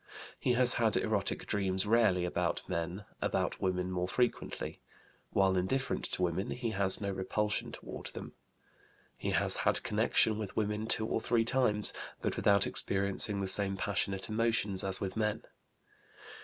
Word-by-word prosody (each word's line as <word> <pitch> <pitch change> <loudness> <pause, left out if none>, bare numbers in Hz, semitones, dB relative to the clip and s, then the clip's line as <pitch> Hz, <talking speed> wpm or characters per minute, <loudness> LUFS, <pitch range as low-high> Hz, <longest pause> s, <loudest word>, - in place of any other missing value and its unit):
He 125 - +1
has 125 +1 +6
had 110 -2 +2
erotic - - -1
dreams 95 -1 -1
rarely 105 -5 +3
about 90 - -2
men, 85 +5 -4 0.2
about - - -1
women 90 -1 -1
more 90 0 -1
frequently. 125 +5 -2 0.5
While 95 -1 +2
indifferent 130 +9 -1
to 90 - -2
women, 90 +3 -1
he 120 -2 -3
has 100 -2 +2
no 100 -1 -3
repulsion 105 +3 -2
toward - - -8
them. - - -8 0.8
He - - -4
has - - +7
had - - +1
connection 110 -1 +2
with 105 -3 -6
women 105 0 -1
two 110 - +1
or 110 - -1
three 115 0 +1
times, 115 -4 +2 0.3
but - - -2
without 100 -1 +3
experiencing 100 +1 +1
the - - -1
same 95 0 +1
passionate 95 -1 -2
emotions 110 -3 0
as 95 -1 -2
with 95 -1 -4
men. 105 -1 -1
100 Hz, 155 wpm, -32 LUFS, 95-110 Hz, 0.8 s, has